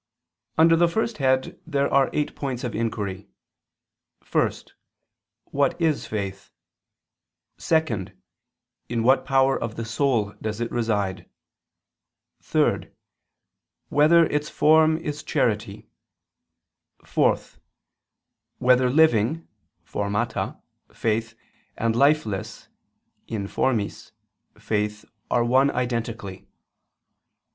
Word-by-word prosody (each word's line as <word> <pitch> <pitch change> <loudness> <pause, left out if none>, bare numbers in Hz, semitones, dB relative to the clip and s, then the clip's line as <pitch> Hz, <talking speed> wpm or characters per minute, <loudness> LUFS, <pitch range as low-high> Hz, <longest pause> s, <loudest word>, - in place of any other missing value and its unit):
Under 165 +1 +6
the 170 +1 +4
first 220 +4 -2
head 130 -1 +1
there 140 -3 +1
are 135 -1 +4
eight 150 - -2
points 130 -4 -4
of 120 - -3
inquiry: 105 -4 -3 1.0
(1) - - +3 1.0
What 140 +4 +1
is 160 -4 0
faith? 100 -2 -5 1.1
(2) 155 - 0 0.8
In 115 -1 -1
what 130 +3 +4
power 135 0 +2
of 115 -1 -4
the 115 - -4
soul 115 -3 0
does 110 0 -4
it 120 0 -3
reside? 105 -5 -1 1.1
(3) - - 0 1.0
Whether 165 +3 +5
its 150 -1 -2
form 155 +1 +4
is 150 -2 -5
charity? 105 -7 -1 1.2
(4) - - +2 1.2
Whether 125 0 +4
living 155 0 +3 0.4
(formata) 105 +3 -2 0.3
faith 115 0 -2 0.4
and 115 0 0
lifeless 135 -7 0 0.6
(informis) 105 +1 -2 0.4
faith 105 0 -2 0.2
are 120 - +2
one 130 +4 +4
identically? 115 -6 -3
120 Hz, 90 wpm, -24 LUFS, 110-145 Hz, 1.2 s, Under